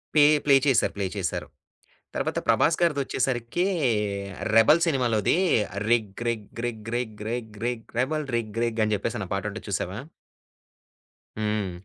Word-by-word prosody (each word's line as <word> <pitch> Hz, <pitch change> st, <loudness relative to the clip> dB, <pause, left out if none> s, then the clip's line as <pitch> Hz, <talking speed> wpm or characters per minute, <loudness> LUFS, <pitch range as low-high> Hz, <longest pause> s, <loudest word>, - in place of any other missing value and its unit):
Pay 150 Hz, -, +7 dB, 0.2 s
play 140 Hz, -2 st, +6 dB
చేసారు. 130 Hz, -5 st, +3 dB
Play 100 Hz, -, -1 dB
చేశారు. 95 Hz, -3 st, -2 dB, 0.7 s
తర్వాత -, -, -1 dB
'ప్రభాస్' 165 Hz, -, +3 dB
గారిదొచ్చేసరికి 135 Hz, -3 st, 0 dB, 0.9 s
'రెబెల్' 150 Hz, +9 st, +6 dB
సినిమాలోది 125 Hz, -, +2 dB, 0.5 s
రిగ్ 110 Hz, -4 st, +2 dB
రిగ్ 110 Hz, -3 st, -2 dB, 0.2 s
రిగ్ 110 Hz, -2 st, -5 dB
రిగ్ 110 Hz, -4 st, -4 dB
రిగ్ 110 Hz, -3 st, -5 dB
రిగ్ 120 Hz, -2 st, -3 dB
రెబెల్ 155 Hz, +4 st, 0 dB
రిగ్ 115 Hz, -1 st, -2 dB
రిగ్ 115 Hz, -1 st, 0 dB
అని 110 Hz, -, 0 dB
చెప్పేసని 110 Hz, -1 st, -3 dB
ఆ -, -, -22 dB
పాటుంటది 105 Hz, +2 st, -4 dB
చూసావా? 95 Hz, 0 st, -2 dB, 1.4 s
హ్మ్. 105 Hz, -3 st, -1 dB
115 Hz, 125 wpm, -26 LUFS, 105-130 Hz, 1.4 s, Pay